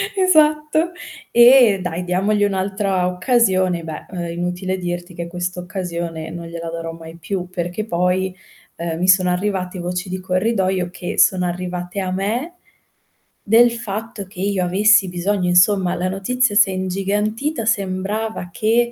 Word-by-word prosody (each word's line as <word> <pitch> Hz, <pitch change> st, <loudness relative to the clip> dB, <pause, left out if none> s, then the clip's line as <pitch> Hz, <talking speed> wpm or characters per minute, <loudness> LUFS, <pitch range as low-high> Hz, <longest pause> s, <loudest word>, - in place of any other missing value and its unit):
Esatto. 310 Hz, -2 st, +3 dB, 0.4 s
E 240 Hz, -4 st, +7 dB
dai, 180 Hz, 0 st, -3 dB
diamogli 195 Hz, +4 st, +1 dB
un'altra 195 Hz, -1 st, 0 dB
occasione, 185 Hz, -3 st, +1 dB
beh, 160 Hz, -1 st, -7 dB
ehm, 175 Hz, -2 st, -4 dB
inutile 180 Hz, +2 st, -3 dB
dirti 175 Hz, 0 st, -5 dB
che 170 Hz, 0 st, -5 dB
questa 180 Hz, +1 st, -4 dB
occasione 170 Hz, -3 st, -5 dB
non 170 Hz, 0 st, -7 dB
gliela 170 Hz, 0 st, -6 dB
darò 165 Hz, 0 st, -5 dB
mai 165 Hz, 0 st, -11 dB
più, 180 Hz, +1 st, -4 dB
perché 175 Hz, +3 st, -3 dB
poi, 180 Hz, 0 st, 0 dB, 0.4 s
ehm, 165 Hz, -1 st, -4 dB
mi 185 Hz, +1 st, +1 dB
sono 185 Hz, -1 st, +5 dB
arrivati 185 Hz, -1 st, -2 dB
voci 180 Hz, +2 st, -3 dB
di 185 Hz, 0 st, -5 dB
corridoio, 185 Hz, -1 st, 0 dB
che 180 Hz, -1 st, -5 dB
sono 180 Hz, -1 st, +4 dB
arrivate 180 Hz, +1 st, -4 dB
a 185 Hz, -1 st, -2 dB
me, 220 Hz, -, -2 dB, 0.9 s
del 235 Hz, +3 st, +6 dB
fatto 225 Hz, -1 st, -5 dB
che 185 Hz, -1 st, -9 dB
io 195 Hz, -1 st, 0 dB
avessi 200 Hz, +2 st, +4 dB
bisogno 180 Hz, +1 st, -1 dB
insomma, 180 Hz, +1 st, +4 dB
la 185 Hz, +1 st, -1 dB
notizia 220 Hz, +5 st, 0 dB
si 205 Hz, -1 st, +6 dB
è -, -, -4 dB
ingigantita, 210 Hz, +8 st, -2 dB
sembrava 200 Hz, -1 st, -2 dB
che 230 Hz, +6 st, +1 dB
185 Hz, 145 wpm, -20 LUFS, 180-210 Hz, 0.9 s, E